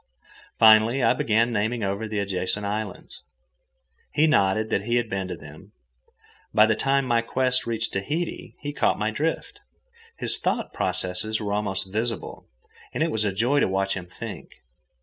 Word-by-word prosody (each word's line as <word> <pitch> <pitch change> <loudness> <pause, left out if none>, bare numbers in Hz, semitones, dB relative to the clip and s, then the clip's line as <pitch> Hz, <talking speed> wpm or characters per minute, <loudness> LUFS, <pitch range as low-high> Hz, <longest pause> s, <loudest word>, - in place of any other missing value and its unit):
Finally, 110 +3 +6
I 115 - +5
began 115 -1 +1
naming 110 +2 -1
over 100 +3 -2
the 105 0 -4
adjacent 100 0 -1
islands. 105 +2 -5 0.9
He 155 - +4
nodded 110 -6 +2
that 100 - 0
he 120 +1 0
had 120 -1 +1
been 95 -1 -2
to 90 - -5
them. 80 +7 -14 0.8
By 105 - +7
the 110 - +2
time 135 +4 +1
my 120 -2 +2
quest 125 +2 0
reached 115 -1 -2
Tahiti, 150 - -3
he 145 0 -4
caught - - +1
my 110 +1 -1
drift. 165 - -3 0.6
His - - +3
thought - - -2
processes 95 +4 0
were 105 -2 -3
almost 95 -2 -2
visible, 115 0 -3 0.5
and - - +1
it 165 - 0
was 105 -1 +1
a 100 - +1
joy 120 +9 +1
to - - +3
watch 95 +1 0
him 90 -2 -6
think. 85 - -8
110 Hz, 170 wpm, -25 LUFS, 100-120 Hz, 0.9 s, By